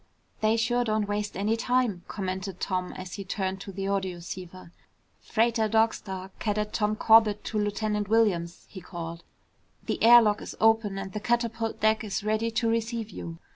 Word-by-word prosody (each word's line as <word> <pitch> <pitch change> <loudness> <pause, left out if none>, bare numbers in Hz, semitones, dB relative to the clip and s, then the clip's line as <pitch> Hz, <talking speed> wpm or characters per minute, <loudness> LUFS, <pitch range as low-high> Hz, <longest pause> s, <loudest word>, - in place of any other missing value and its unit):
"They 220 +1 +2
sure 240 +2 +1
don't 215 -2 0
waste 205 -1 -3
any 210 +3 +1
time," 240 -5 0
commented 190 -1 -4
Tom 185 -1 -2
as 185 0 -8
he 200 - -5
turned 190 0 -3
to 195 - -7
the 195 +1 -4
audioceiver. 185 -2 -4 0.5
"Freighter 225 -1 +1
Dog 225 +1 +3
Star, 190 -1 -7
Cadet 210 -1 -1
Tom 210 -1 +1
Corbett 220 -1 +5
to 215 - -2
Lieutenant 210 0 -1
Williams," 185 -7 +1
he 190 - -10
called, 170 -1 -7 0.6
"the - - -2
air 240 +1 +9
lock 210 -1 +1
is - - -8
open 220 -3 +3
and 195 -1 -6
the 210 - -3
catapult 230 0 -1
deck 220 +1 +3
is 205 -1 -3
ready 215 +2 0
to 230 +1 0
receive 225 -1 -1
you." 165 -2 -7
210 Hz, 175 wpm, -27 LUFS, 190-225 Hz, 0.6 s, air